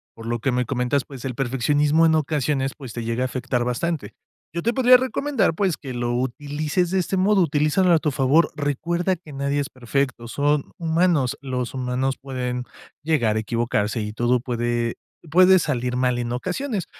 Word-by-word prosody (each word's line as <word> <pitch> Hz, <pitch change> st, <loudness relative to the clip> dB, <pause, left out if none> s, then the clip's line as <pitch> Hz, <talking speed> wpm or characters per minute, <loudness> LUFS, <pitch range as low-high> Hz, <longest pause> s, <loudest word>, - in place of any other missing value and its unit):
por 115 Hz, -, -10 dB
lo 120 Hz, 0 st, -2 dB
que 135 Hz, +4 st, 0 dB
me 125 Hz, 0 st, 0 dB
comentas, 125 Hz, +2 st, 0 dB
pues 135 Hz, -3 st, -10 dB
el 130 Hz, -2 st, -3 dB
perfeccionismo 145 Hz, +5 st, +2 dB
en 160 Hz, -, +3 dB
ocasiones, 145 Hz, -3 st, 0 dB
pues 130 Hz, -6 st, -9 dB
te 120 Hz, -, -4 dB
llega 115 Hz, +2 st, -2 dB
a -, -, +1 dB
afectar 125 Hz, -1 st, -2 dB
bastante. 140 Hz, +6 st, -2 dB, 0.4 s
Yo 170 Hz, +1 st, -4 dB
te 235 Hz, -, +1 dB
podría 255 Hz, -1 st, +7 dB
recomendar, 260 Hz, -, 0 dB
pues 185 Hz, -1 st, 0 dB
que 130 Hz, -3 st, -7 dB
lo 120 Hz, 0 st, -2 dB
utilices 145 Hz, +7 st, -1 dB
de 190 Hz, -, 0 dB
este 185 Hz, +1 st, 0 dB
modo, 195 Hz, +1 st, +3 dB
utilízalo 155 Hz, +3 st, +2 dB
a 160 Hz, -, +5 dB
tu 155 Hz, -, 0 dB
favor. 140 Hz, +4 st, +3 dB
Recuerda 170 Hz, +6 st, -1 dB
que 160 Hz, -3 st, -14 dB
nadie 140 Hz, +1 st, -1 dB
es 140 Hz, -, -2 dB
perfecto. 130 Hz, -1 st, -2 dB
Son 145 Hz, +3 st, 0 dB
humanos. 165 Hz, -5 st, +1 dB
Los 130 Hz, -2 st, -3 dB
humanos 130 Hz, +1 st, -1 dB
pueden 125 Hz, -2 st, -3 dB, 0.4 s
llegar 135 Hz, -9 st, +1 dB
a -, -, +1 dB
equivocarse 115 Hz, -1 st, -1 dB
y 105 Hz, 0 st, -4 dB
todo 120 Hz, +3 st, +1 dB
puede 120 Hz, -1 st, -1 dB, 0.4 s
puede 185 Hz, +2 st, +6 dB
salir 125 Hz, -5 st, -1 dB
mal 125 Hz, -1 st, +1 dB
en 120 Hz, 0 st, -3 dB
ocasiones. 185 Hz, -, -3 dB
135 Hz, 185 wpm, -23 LUFS, 125-160 Hz, 0.4 s, podría